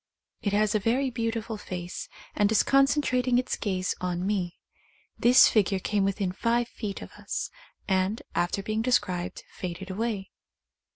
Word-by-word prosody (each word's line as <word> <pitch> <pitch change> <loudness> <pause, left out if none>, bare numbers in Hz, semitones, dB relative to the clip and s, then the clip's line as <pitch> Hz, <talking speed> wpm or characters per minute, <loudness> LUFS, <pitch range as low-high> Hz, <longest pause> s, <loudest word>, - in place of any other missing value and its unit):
It 205 - 0
has 210 0 +3
a 215 - +3
very 255 +6 +1
beautiful 230 -1 -2
face, 180 -3 -6 0.2
and 205 0 +2
is 220 - +4
concentrating 270 -3 +3
its 250 0 0
gaze 185 -3 -1
on 180 0 -1
me. 190 -4 -1 0.6
This 245 +2 +7
figure 200 -3 +2
came 200 +1 0
within 195 -1 0
five 235 +5 +1
feet 205 -3 -5
of - - -11
us, - - -3 0.4
and, 190 +3 +1
after 180 +3 0
being 215 +1 -1
described, 185 -7 0
faded 185 +1 -6
away. 210 -1 -2
210 Hz, 150 wpm, -27 LUFS, 185-230 Hz, 0.6 s, This